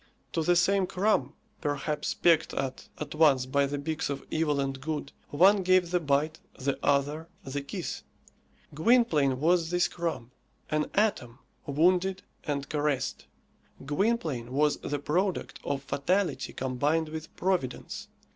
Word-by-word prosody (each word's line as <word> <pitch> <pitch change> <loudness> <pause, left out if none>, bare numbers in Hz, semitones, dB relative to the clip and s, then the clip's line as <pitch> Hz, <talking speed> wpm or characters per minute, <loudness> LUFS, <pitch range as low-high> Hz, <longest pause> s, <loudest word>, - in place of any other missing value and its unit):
To 165 - +1
the 175 +3 +3
same 185 +2 +3
crumb, 180 -8 +1 0.3
perhaps 145 +1 -2
pecked 165 -2 +3
at 135 -1 -4
at 150 -1 -5
once 150 -5 +4
by 140 +2 +2
the 145 +1 -3
beaks 155 +2 -2
of 140 - -4
evil 150 -3 +1
and 135 -1 -2
good, 150 -1 -3 0.2
one 190 +7 +5
gave 185 -1 +3
the 180 - +3
bite, 150 0 0 0.2
the 135 +1 -1
other 145 +3 +1 0.2
the 140 +1 -4
kiss. 140 - -5 0.7
Gwynplaine 155 - +3
was 165 +2 +3
this 175 0 +2
crumb 165 -9 -4 0.4
an 155 0 0
atom, 165 - +1 0.3
wounded 180 +6 +2 0.2
and 140 -2 -2
caressed. 150 -3 -1 0.6
Gwynplaine 150 - 0
was 150 +2 +2
the 145 - -3
product 180 +7 -1
of 140 -1 -2
fatality 180 +8 0
combined 145 +5 0
with 160 0 -7
Providence. 180 -9 -2
150 Hz, 135 wpm, -29 LUFS, 140-175 Hz, 0.7 s, one